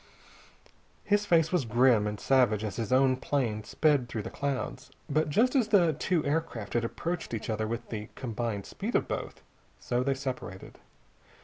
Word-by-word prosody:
His 205 0 +1
face 165 -3 +4
was 180 -6 +2
grim 120 -1 +3
and 105 -1 -4
savage 120 -6 +3
as 105 -3 -4
his 115 -3 -3
own 130 0 +4
plane 120 -6 -1
sped 140 +1 +2
through 110 -3 -4
the - - -6
clouds. 140 -2 -3 0.2
But 155 0 +1
just 245 - +3
as 250 -5 +3
the 180 -7 +4
two 160 +2 0
aircraft 145 -8 -2
had 120 - +1
approached 165 +3 -3
each 110 - -4
other 110 0 -1
with 115 +1 -5
the 105 -2 -5
combined 115 -5 -3
speed - - -4
of - - +2
both, - - -5 0.4
so 120 0 -1
they 135 +1 +1
separated. 130 -8 -6
130 Hz, 175 wpm, -29 LUFS, 110-155 Hz, 0.4 s, face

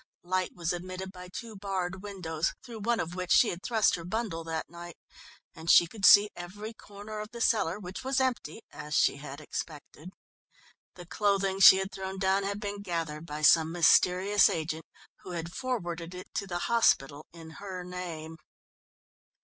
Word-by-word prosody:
Light 185 +1 -2
was 170 -1 -2
admitted 185 +2 -6
by 180 -1 -11
two 220 +5 -8
barred 190 -2 -3
windows, 175 -6 -3
through 235 -3 -9
one 230 +2 0
of 170 +1 -3
which 180 0 -4
she 230 - +6
had 175 - -5
thrust 220 -2 +2
her 170 - -3
bundle 185 -3 -3
that 160 -1 -4
night, 170 0 -10 0.6
and 165 -1 -8
she 175 - +8
could 200 +4 -3
see 205 +1 +8
every 205 +6 -8
corner 210 0 -9
of 210 0 -6
the 235 - -9
cellar, 210 -7 +1
which 190 +1 -8
was 265 +1 0
empty 255 -3 -2
as 150 0 -6
she - - +3
had 140 0 -9
expected. 155 +2 -7 0.9
The 175 - -11
clothing 195 +1 0
she 190 0 +10
had 190 +1 -3
thrown 190 0 -6
down 190 +1 +2
had 200 +1 -3
been 205 -1 -5
gathered 165 -4 -4
by 150 0 -6
some 160 +1 +5
mysterious 180 +3 +4
agent, 160 0 -4 0.3
who 180 - -9
had 170 0 -5
forwarded 175 -9 -4
it 180 - -10
to 200 - -3
the 175 -2 -3
hospital 150 - +2
in 165 -1 -12
her 190 -3 -6
name. 170 -3 -7
180 Hz, 175 wpm, -29 LUFS, 165-205 Hz, 0.9 s, she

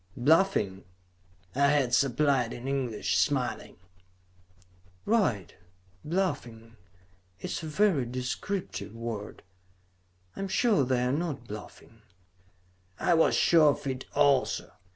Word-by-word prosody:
"Bluffing?" 125 - +2 0.7
I 140 +2 +3
had 140 -4 +2
supplied 130 -1 +2
in 120 +2 -7
English, 130 -5 -1
smiling. - - -1 1.3
"Right! 185 - +1 0.5
Bluffing. 120 -10 -3 0.6
It - - -5
is - - -3
a 160 - -6
very 155 - +2
descriptive 125 - -4
word. 115 -3 -6 0.9
I - - -10
am 195 - -2
sure 195 - +2
they 125 -1 +1
are 125 - +1
not 145 -5 -3
bluffing." 105 +1 -11 1.0
I 175 - +2
was 165 -1 +4
sure 160 -3 +5
of - - -11
it 130 -1 -4
also. 140 -3 +2
135 Hz, 110 wpm, -28 LUFS, 120-160 Hz, 1.3 s, sure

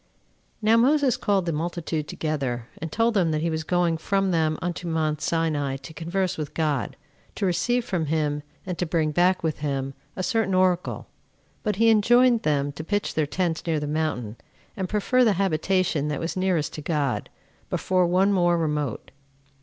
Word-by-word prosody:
1. 215 +1 +3
Now 230 - +6
Moses 270 +1 +4
called 195 -3 +1
the 170 - 0
multitude 160 -1 -3
together, 135 -7 -3
and 165 -1 -4
told 230 +4 +2
them 185 -6 +2
that 155 -1 0
he 165 - 0
was 160 0 -2
going 175 0 +1
from 195 +3 0
them 160 -2 +1
unto 175 0 -4
mount 155 -2 -1
Sinai 150 -5 0
to 135 +4 -11
converse 180 +2 -2
with 150 -2 -5
God; 150 -5 -1 0.4
to - - -1
receive 230 +8 +1
from 175 -8 -1
him, 150 -1 0 0.2
and 180 -2 -4
to 180 - 0
bring 160 -2 +1
back 180 +3 +2
with 160 -2 -1
him, 135 -2 -2 0.2
a 185 - -3
certain 195 0 +1
oracle; 185 -1 +1 0.6
but 210 -3 -1
he 225 +3 +5
enjoined 240 +2 +5
them 145 -2 0
to 145 +3 -7
pitch 205 +5 -1
their 155 -2 0
tents 170 0 -1
near 160 -2 +1
the 150 - -3
mountain, 145 -8 -2 0.4
and 190 -2 -3
prefer 230 +5 +2
the 220 -4 +4
habitation 185 -3 +1
that 150 -2 -2
was 165 - -3
nearest 185 -5 0
to 155 - -6
God, 145 -4 -1 0.4
before 185 -1 +1
one 190 +3 +3
more 175 -2 +3
remote. 150 -6 -2
170 Hz, 185 wpm, -25 LUFS, 155-190 Hz, 0.6 s, Now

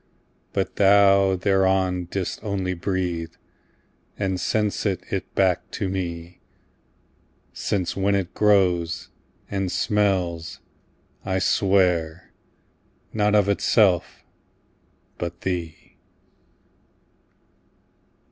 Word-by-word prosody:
But - - -2
thou 100 -1 +5
thereon 95 -1 +1
didst 90 +1 -4
only 95 -3 -2
breathe, 90 -2 -3 0.8
And 95 -2 -1
sent'st 100 -1 -1
back 95 -3 +1
to 95 - -3
me: 85 -2 -5 1.1
Since 95 -4 -2
when 100 +1 +1
it 95 -3 -2
grows, 90 -5 +2 0.4
and 95 -2 -1
smells, 95 -5 0 0.6
I 95 -1 -1
swear, 90 -4 +1 0.8
Not 105 -1 +2
of 105 -2 +4
itself, 100 -2 +2 1.0
but 85 0 -5
thee. 85 -4 -5
95 Hz, 80 wpm, -23 LUFS, 90-100 Hz, 1.1 s, thou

